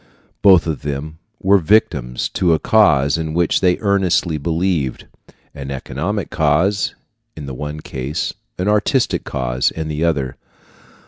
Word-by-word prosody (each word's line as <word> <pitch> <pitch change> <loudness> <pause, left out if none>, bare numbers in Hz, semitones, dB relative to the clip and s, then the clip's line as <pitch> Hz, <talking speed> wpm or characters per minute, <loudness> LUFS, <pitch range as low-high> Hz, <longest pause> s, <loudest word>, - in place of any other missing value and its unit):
Both 95 -5 +6
of 80 -4 -3
them 75 +2 -5 0.2
were 100 +1 +5
victims 75 - +1
to 85 -3 +2
a - - +1
cause 80 - +3
in 80 -1 -3
which 85 -1 +2
they 90 -1 +3
earnestly 95 -5 +1
believed 80 -3 -1 0.5
an 70 -1 -7
economic 80 +9 -4
cause 85 +6 +1 0.4
in 75 - -7
the 70 - -6
one 75 +3 -6
case, 70 +4 -4 0.2
an 90 - -2
artistic 105 +5 +1
cause 65 -1 0
in 80 -1 -5
the 75 +1 -2
other. 70 -6 -1
80 Hz, 140 wpm, -19 LUFS, 70-95 Hz, 0.5 s, Both